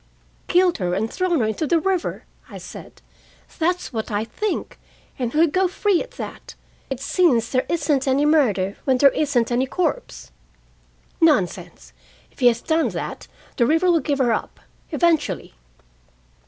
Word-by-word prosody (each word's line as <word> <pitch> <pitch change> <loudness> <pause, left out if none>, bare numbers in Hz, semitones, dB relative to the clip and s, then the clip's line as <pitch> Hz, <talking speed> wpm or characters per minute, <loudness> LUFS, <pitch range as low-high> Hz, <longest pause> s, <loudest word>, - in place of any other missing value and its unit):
"Killed 360 -3 +3
her 180 -1 -1
and 220 +3 -2
thrown 360 -6 +1
her - - +2
into 220 +8 -2
the 335 +3 +3
river," 375 0 -2 0.3
I - - -9
said. - - -11 0.6
"That's 355 -1 -1
what 220 -1 -3
I 210 0 -1
think, 380 - -4 0.4
and 245 -2 -1
he'll 315 +4 +4
go 370 +4 +1
free 380 0 +1
at - - -9
that. - - -8 0.3
It 270 -2 -4
seems 270 - +2
there 255 -1 0
isn't 295 -5 0
any 270 +2 +2
murder 215 -11 +2
when 265 -2 +3
there 275 +1 +6
isn't 265 -6 0
any 250 +2 +1
corpse." 365 - -3 0.9
"Nonsense! 290 - +1 0.4
If - - -23
he 250 - +5
has 235 -1 +3
done 320 0 +1
that, - - -6 0.3
the 235 - +3
river 325 +5 +3
will 335 - +3
give 290 -2 -1
her 245 -4 +2
up, - - -4 0.3
eventually." 330 -4 0
290 Hz, 160 wpm, -22 LUFS, 240-340 Hz, 0.9 s, there